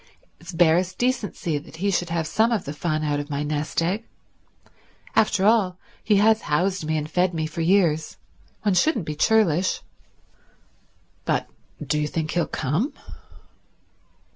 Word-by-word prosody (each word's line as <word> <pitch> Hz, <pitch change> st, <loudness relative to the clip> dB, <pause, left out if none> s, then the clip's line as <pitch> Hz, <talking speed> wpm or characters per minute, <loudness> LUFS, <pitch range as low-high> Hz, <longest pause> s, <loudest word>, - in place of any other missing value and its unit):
It's 170 Hz, +3 st, -9 dB
barest 175 Hz, +2 st, +2 dB
decency 215 Hz, -, -1 dB
that 145 Hz, -, -14 dB
he 200 Hz, +5 st, 0 dB
should 175 Hz, -2 st, 0 dB
have 165 Hz, -1 st, -1 dB
some 220 Hz, +9 st, +2 dB
of 225 Hz, -, 0 dB
the 145 Hz, -, -5 dB
fun 155 Hz, 0 st, -2 dB
out 145 Hz, -1 st, 0 dB
of 145 Hz, +1 st, -6 dB
my 145 Hz, 0 st, -2 dB
nest 150 Hz, +2 st, -1 dB
egg. 200 Hz, +7 st, -2 dB, 1.1 s
After 210 Hz, -2 st, +3 dB
all, 205 Hz, -5 st, +3 dB, 0.3 s
he 210 Hz, -, +3 dB
has 220 Hz, +2 st, +4 dB
housed 180 Hz, +4 st, 0 dB
me 155 Hz, 0 st, 0 dB
and 150 Hz, 0 st, -3 dB
fed 180 Hz, +3 st, +1 dB
me 160 Hz, -1 st, -1 dB
for 155 Hz, +1 st, -4 dB
years. 160 Hz, -, +2 dB, 0.5 s
One 205 Hz, -2 st, +2 dB
shouldn't 220 Hz, -, +2 dB
be 155 Hz, -, -3 dB
churlish." 185 Hz, 0 st, +2 dB, 1.4 s
"But—do 150 Hz, -, -3 dB
you 150 Hz, -, 0 dB
think 160 Hz, +1 st, -3 dB
he'll 175 Hz, -, 0 dB
come? 165 Hz, -, -1 dB
170 Hz, 150 wpm, -24 LUFS, 155-200 Hz, 1.4 s, has